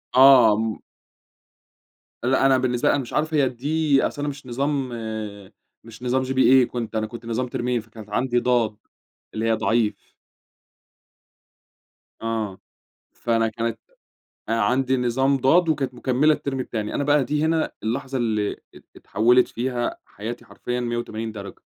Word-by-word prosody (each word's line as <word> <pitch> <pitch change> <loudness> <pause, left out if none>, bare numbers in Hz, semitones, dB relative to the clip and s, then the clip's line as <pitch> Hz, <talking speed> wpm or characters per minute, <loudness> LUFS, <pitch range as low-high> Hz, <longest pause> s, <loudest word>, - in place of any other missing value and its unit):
آه، 130 -5 +8
م 110 -1 -2 1.5
لأ 130 +2 +2
أنا 135 -1 +5
بالنسبة 125 -1 +1
لي - - +4
أنا 140 - 0
مش 120 - -9
عارف 155 +1 0
هي 140 -4 +3
الD 125 +2 -13 0.4
أصل 145 - -4
أنا 145 - -1
مش 145 -1 -9
نظام 135 +1 -1 0.9
مش 115 +1 -13
نظام 130 +1 +1
GPA 130 0 +5
كنت 115 -2 -5
أنا 110 0 0
كنت 115 +1 -10
نظام 115 +2 -2
ترمين 120 -1 -1
فكانت 110 -1 -13
عندي 120 +3 +1
ضاد، 120 -3 +1 0.6
اللي 110 +1 -2
هي - - +4
ضعيف. 110 0 -1 2.1
آه، 110 -4 -3 0.5
فأنا 115 -1 0
كانت 115 0 -3 0.7
عندي 125 +4 +1
نظام 130 +3 +1
ضاد 165 +7 +3
وكانت 135 -5 0
مكملة 135 +5 +2
الترم 135 -3 -4
التاني، 110 -4 -3
أنا - - 0
بقى 145 -1 +3
دي 150 +3 0
هنا 160 0 +1
اللحظة 130 +4 -2
اللي 110 -4 0 0.2
ات - - -15
اتحولت 120 +5 +3
فيها 120 0 -2
حياتي 120 +3 -7
حرفيًا 125 +1 -4
مِيَّة 120 -1 -2
وتمانين 115 -1 -4
درجة. 100 -2 -9
125 Hz, 145 wpm, -23 LUFS, 115-135 Hz, 2.1 s, آه